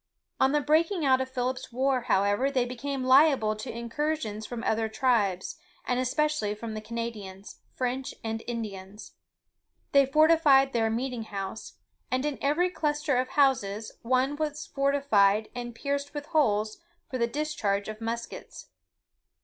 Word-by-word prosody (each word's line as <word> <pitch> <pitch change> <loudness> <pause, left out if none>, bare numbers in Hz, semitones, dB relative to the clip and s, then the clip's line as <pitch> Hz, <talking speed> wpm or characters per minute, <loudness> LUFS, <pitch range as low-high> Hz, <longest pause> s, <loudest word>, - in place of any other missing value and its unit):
On 265 - +4
the 295 0 +2
breaking 320 +4 +2
out 260 -1 +4
of 260 - -3
Philip's 255 0 -3
war, 260 +1 +1
however, 205 +5 +2
they 255 -3 +1
became 260 +2 -4
liable 260 -5 +5
to 240 +4 -6
incursions 235 -2 -3
from 235 -1 -6
other 220 -1 0
tribes, 220 - 0 0.3
and 250 0 0
especially 255 -4 0
from 220 +1 -6
the 215 - -5
Canadians, 215 -4 -6 0.2
French, 255 +1 -2
and 225 0 -3
Indians. 210 -4 -6 0.8
They 280 -1 +5
fortified 300 -2 +5
their 225 -2 +2
"meeting 240 0 -3
house;" 195 0 -6 0.4
and 255 +2 0
in 295 -2 -2
every 335 +6 +2
cluster 295 -4 0
of 255 +1 +1
houses, 225 -7 +1
one 260 +4 +1
was 305 0 -3
fortified 225 -7 +2
and 240 -1 -6
pierced 280 +3 -3
with 290 0 -4
holes 215 -9 +1 0.3
for 255 - -2
the 235 - +2
discharge 235 -8 -1
of 215 +1 -7
muskets. 230 +1 -6
255 Hz, 145 wpm, -28 LUFS, 220-280 Hz, 0.8 s, liable